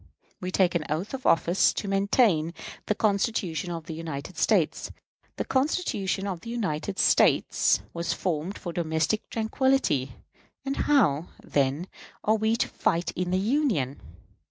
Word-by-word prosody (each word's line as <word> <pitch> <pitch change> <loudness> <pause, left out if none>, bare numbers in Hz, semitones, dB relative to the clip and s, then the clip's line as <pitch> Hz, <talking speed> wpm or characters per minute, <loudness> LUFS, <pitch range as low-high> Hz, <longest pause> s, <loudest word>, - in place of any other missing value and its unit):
We 185 - -4
take 185 -1 +2
an 170 - 0
oath 160 - -2
of 265 -1 -3
office 170 +3 +4
to 205 - -4
maintain 195 -4 +2 0.3
the 210 - +1
Constitution 200 -5 0
of 165 -2 -5
the 165 - -6
United 160 0 -6
States. 165 0 +1 0.5
The - - -3
Constitution 260 - 0
of 185 -4 -4
the 230 - -9
United 200 -5 -2
States - - +3
was 170 0 -2
formed 170 +1 -2
for 175 - -6
domestic 160 +5 -1
tranquillity; 220 - +1 0.5
and 275 0 -1
how, 175 - +2 0.2
then, 140 +4 0 0.4
are 215 - +3
we 220 +1 +1
to - - 0
fight 170 +1 0
in 180 0 -3
the 185 - +1
Union? 200 - 0
185 Hz, 145 wpm, -27 LUFS, 160-220 Hz, 0.5 s, office